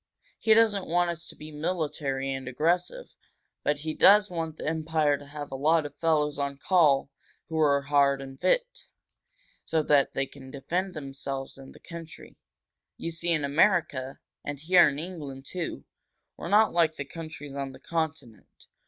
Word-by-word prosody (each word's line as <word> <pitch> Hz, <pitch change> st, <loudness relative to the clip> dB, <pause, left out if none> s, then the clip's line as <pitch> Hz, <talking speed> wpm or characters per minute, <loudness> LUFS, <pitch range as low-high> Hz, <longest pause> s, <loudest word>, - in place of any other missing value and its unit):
He 220 Hz, -1 st, +5 dB
doesn't 215 Hz, -4 st, +3 dB
want 175 Hz, +1 st, +2 dB
us 170 Hz, 0 st, -7 dB
to -, -, -11 dB
be 155 Hz, +1 st, -10 dB
military 150 Hz, -4 st, -2 dB
and 135 Hz, -1 st, -6 dB
aggressive, 175 Hz, -, 0 dB, 0.6 s
but 145 Hz, -, +1 dB
he 155 Hz, +2 st, -4 dB
does 205 Hz, +2 st, +6 dB
want 165 Hz, -2 st, -4 dB
the -, -, -6 dB
Empire 155 Hz, -2 st, +1 dB
to 145 Hz, 0 st, -11 dB
have 145 Hz, -1 st, -7 dB
a -, -, -4 dB
lot 155 Hz, +3 st, +2 dB
of 145 Hz, -1 st, -8 dB
fellows 150 Hz, -3 st, +1 dB
on 140 Hz, -1 st, -2 dB
call 145 Hz, -5 st, +3 dB, 0.4 s
who 160 Hz, -1 st, -2 dB
are 140 Hz, -2 st, +3 dB
hard 140 Hz, -1 st, +3 dB
and 135 Hz, -1 st, -10 dB
fit, -, -, 0 dB, 0.8 s
so 160 Hz, -1 st, 0 dB
that 145 Hz, -2 st, +3 dB
they 135 Hz, -, 0 dB
can 135 Hz, -1 st, -13 dB
defend 175 Hz, +8 st, -3 dB
themselves 135 Hz, -2 st, -5 dB
and 135 Hz, -, -12 dB
the -, -, -14 dB
country. 170 Hz, -2 st, -10 dB, 0.6 s
You 165 Hz, -, -4 dB
see, 170 Hz, +1 st, -1 dB
in 155 Hz, -4 st, +1 dB
America, 145 Hz, -4 st, +2 dB, 0.3 s
and 145 Hz, -1 st, -5 dB
here 175 Hz, +1 st, +6 dB
in 140 Hz, -, -5 dB
England, 150 Hz, -5 st, -7 dB
too, 165 Hz, -, -5 dB, 0.5 s
we're -, -, -7 dB
not 215 Hz, +2 st, +5 dB
like 165 Hz, -2 st, +3 dB
the 140 Hz, -, -5 dB
countries 155 Hz, -1 st, -8 dB
on 140 Hz, -1 st, -4 dB
the 130 Hz, -, -13 dB
Continent. 160 Hz, -7 st, -5 dB
155 Hz, 170 wpm, -27 LUFS, 140-170 Hz, 0.8 s, does